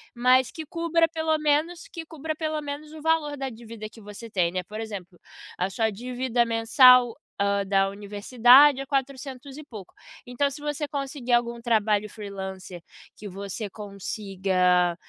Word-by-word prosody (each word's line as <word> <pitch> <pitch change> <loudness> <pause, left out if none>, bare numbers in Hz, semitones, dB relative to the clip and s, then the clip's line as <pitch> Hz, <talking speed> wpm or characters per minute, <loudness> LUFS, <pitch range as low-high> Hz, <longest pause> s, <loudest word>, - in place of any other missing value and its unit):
Mas 250 +1 +4
que 320 - -8
cubra 335 +1 +1
pelo 320 -1 0
menos, 305 +3 0
que 330 -2 -7
cubra 315 0 -5
pelo 310 -1 -2
menos 295 +1 -7
o 315 - -10
valor 320 -2 +1
da 270 -1 -3
dívida 225 -2 -9
que 225 - -16
você 210 +3 -10
tem, 180 -5 +1
né. 185 0 -3
Por 215 +4 -8
exemplo, 195 -5 -7 0.4
a 180 - -1
sua 220 +3 0
dívida 245 +2 -1
mensal, 235 +1 +6 0.3
hã, 200 0 +1
da 195 0 +2
universidade 240 +7 +5
é - - -6
400 270 0 -4
e 305 - -8
pouco. 215 - -11 0.4
Então, 250 +3 0
se 290 +2 -9
você 295 0 -3
conseguir 275 -3 -4
algum 235 0 +1
trabalho 215 -3 +1
freelancer 190 -4 -8 0.3
que 210 - -8
você 200 +2 -6
consiga 190 -3 0
240 Hz, 160 wpm, -25 LUFS, 200-285 Hz, 0.4 s, mensal